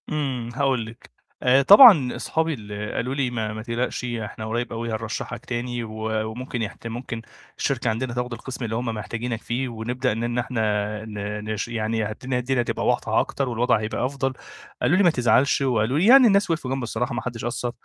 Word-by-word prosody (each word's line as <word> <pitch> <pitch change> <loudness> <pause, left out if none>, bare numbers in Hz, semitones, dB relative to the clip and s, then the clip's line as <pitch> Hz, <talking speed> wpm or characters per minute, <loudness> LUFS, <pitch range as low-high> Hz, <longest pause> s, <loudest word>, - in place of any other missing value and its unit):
إمم، 135 -6 -2
هاقول 130 -4 +1
لِك. 115 +1 -13 0.3
آآ 130 +2 +5
طبعًا 195 - +8
أصحابي 160 0 -1
اللي 105 -3 -6
قالوا 130 +3 -2
لي: 135 -3 0
"ما 110 -3 -3
ما 110 - -6
تقلقش 120 +1 -2
إحنا 110 -2 -5
قريّب 120 +2 -2
أوي 115 +1 -4
هنرشّحك 115 +2 -5
تاني 120 0 -3
و 110 0 -3
وممكن 125 +1 -5
يحت 110 +1 -5
ممكن 115 0 -5 0.4
الشركة 125 -4 0
عندنا 120 +2 -2
تاخُد 125 0 -3
القِسْم 125 +1 -6
اللي 110 0 -3
هم 120 +2 -2
محتاجينك 115 +1 -4
فيه 125 +2 -2
ونبدأ 120 +3 -2
إن 120 +2 -2
إحنا 120 -1 -2
آآ 105 0 -1
ن 105 -1 -5
نش 105 +1 -3
يعني 110 -1 -1
هدي 125 +5 -3
الدنيا 125 0 0
تبقى - - -3
واضحة - - +2
أكتر 140 -2 -1
والوضع 120 -1 +2
هيبقى 110 +3 -2
أفضل."، 135 0 -2 0.5
قالوا 175 - +3
لي: 200 - +4
"ما 175 - +6
تزعلش." 130 -1 +3
وقالوا 125 -1 +1
لي 180 - +3
يعني 255 +2 +8
الناس 200 -3 +3
وقفوا 155 -6 -2
جنبي 135 -1 -2
الصراحة 120 +2 -2
محدش 120 -2 -4
قصّر، 120 0 -2
120 Hz, 190 wpm, -24 LUFS, 110-130 Hz, 0.5 s, طبعًا